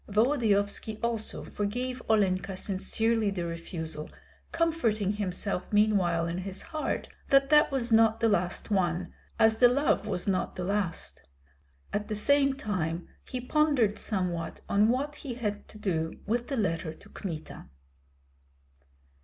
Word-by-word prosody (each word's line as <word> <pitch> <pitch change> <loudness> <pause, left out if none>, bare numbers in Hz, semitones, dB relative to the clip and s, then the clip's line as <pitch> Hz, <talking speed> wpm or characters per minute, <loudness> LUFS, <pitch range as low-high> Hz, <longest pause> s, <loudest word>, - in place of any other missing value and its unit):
Volodyovski 215 -2 +2
also 230 -2 -2
forgave 245 +5 -3
Olenka 195 -3 +2
sincerely 220 +3 0
the 180 -3 -3
refusal, 165 -2 -5 0.4
comforting 240 - +1
himself 195 -2 -3
meanwhile 195 -6 +3
in 170 +2 -3
his 190 +1 -5
heart 310 -1 -3 0.2
that 275 0 +4
that 300 0 +6
was 250 -3 0
not 225 0 +5
the 230 - +3
last 180 0 0
one, 180 -2 0 0.2
as 220 0 +4
the 245 - +7
love 250 -4 +1
was 185 -3 -2
not 190 -2 0
the 180 - -3
last. 195 -2 -2 0.7
At 210 +1 -1
the 215 - -2
same 275 +5 +3
time 175 - -3 0.2
he 255 - -3
pondered 255 -5 +2
somewhat 180 -5 -2
on 205 +2 +4
what 285 +5 -1
he 260 -6 -6
had 210 -4 -3
to - - -12
do 165 -6 -2
with 235 +3 -1
the 275 - -2
letter 165 -6 -1
to - - -17
Kmita. 165 -6 -7
210 Hz, 140 wpm, -29 LUFS, 185-240 Hz, 0.7 s, the